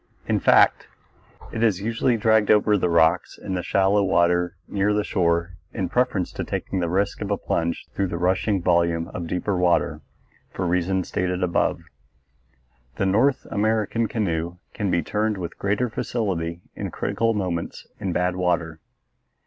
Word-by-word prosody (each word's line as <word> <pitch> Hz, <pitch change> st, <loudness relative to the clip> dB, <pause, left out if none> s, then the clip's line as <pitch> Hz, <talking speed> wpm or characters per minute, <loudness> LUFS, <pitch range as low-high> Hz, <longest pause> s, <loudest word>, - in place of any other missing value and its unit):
In -, -, +1 dB
fact, -, -, +4 dB, 0.7 s
it 115 Hz, -, -3 dB
is 110 Hz, -6 st, +2 dB
usually 115 Hz, +3 st, 0 dB
dragged 110 Hz, -1 st, +3 dB
over 105 Hz, 0 st, +4 dB
the 90 Hz, -3 st, +1 dB
rocks 80 Hz, -1 st, +2 dB
in 95 Hz, -, -5 dB
the 90 Hz, -, -1 dB
shallow 100 Hz, +3 st, +2 dB
water 90 Hz, -1 st, +2 dB
near 105 Hz, +1 st, +1 dB
shore 85 Hz, -2 st, 0 dB, 0.2 s
in -, -, -2 dB
preference 125 Hz, -8 st, 0 dB
to -, -, -4 dB
taking 95 Hz, -, -3 dB
the 85 Hz, -2 st, -1 dB
risk 100 Hz, +3 st, 0 dB
of 100 Hz, -, -3 dB
a 100 Hz, -, +1 dB
plunge 85 Hz, 0 st, -2 dB
through 100 Hz, -, 0 dB
the 85 Hz, -, -4 dB
rushing 95 Hz, +2 st, +1 dB
volume 85 Hz, -2 st, +2 dB
of 85 Hz, -2 st, -5 dB
deeper 90 Hz, +4 st, -1 dB
water, 80 Hz, -4 st, +1 dB, 0.5 s
for 95 Hz, -, -3 dB
reasons 90 Hz, +1 st, 0 dB
stated 90 Hz, 0 st, -1 dB
above. 90 Hz, -1 st, +1 dB, 1.1 s
The 95 Hz, -, 0 dB
North 115 Hz, +8 st, +2 dB
American 110 Hz, +2 st, +1 dB
canoe 85 Hz, -6 st, -2 dB, 0.2 s
can 105 Hz, -3 st, -2 dB
be 85 Hz, -1 st, +1 dB
turned 105 Hz, 0 st, -1 dB
with 85 Hz, -2 st, -6 dB
greater 100 Hz, +5 st, 0 dB
facility 90 Hz, -8 st, -3 dB
in -, -, -4 dB
critical 115 Hz, -1 st, -1 dB
moments 90 Hz, -5 st, -3 dB
in 95 Hz, -, -2 dB
bad 90 Hz, +1 st, 0 dB
water. 85 Hz, -3 st, -1 dB
95 Hz, 155 wpm, -23 LUFS, 85-105 Hz, 1.1 s, fact